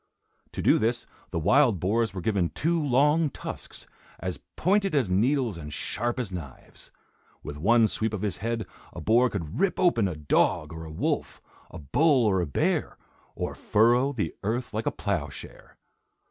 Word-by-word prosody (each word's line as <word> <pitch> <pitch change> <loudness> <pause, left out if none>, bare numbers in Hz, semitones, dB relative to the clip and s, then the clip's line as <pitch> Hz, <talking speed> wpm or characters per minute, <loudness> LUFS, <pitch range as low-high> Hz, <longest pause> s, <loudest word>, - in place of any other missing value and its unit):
To - - -4
do - - +5
this, 115 +2 0 0.2
the - - -4
wild 120 - +3
boars 110 +4 +1
were 95 0 -6
given 95 -4 +1
two 165 - 0
long 150 +4 +3
tusks, - - -8 0.3
as 90 +1 -4 0.2
pointed 195 0 +1
as 125 -10 +1
needles 115 - +1
and 75 -1 -8
sharp 120 - -2
as 115 -6 -3
knives. 80 -8 -10 0.5
With 75 - -6
one 110 +9 +4
sweep 110 +1 -1
of 105 -2 -4
his 100 -4 -2
head 115 0 -2 0.3
a - - -7
boar 120 +3 +3
could 85 -8 -5
rip 195 -1 +1
open 120 - +3
a 90 - -4
dog 75 -1 +1
or 80 0 -7
a 80 - -9
wolf, 80 - -2 0.3
a - - -9
bull 130 - +2
or 95 -3 +2
a 85 - -2
bear, 70 - 0 0.4
or - - -3
furrow 120 +6 +3
the 105 - -3
earth 115 +4 -2
like 110 +1 -2
a - - +2
ploughshare. 85 -9 -5
110 Hz, 175 wpm, -27 LUFS, 90-125 Hz, 0.5 s, do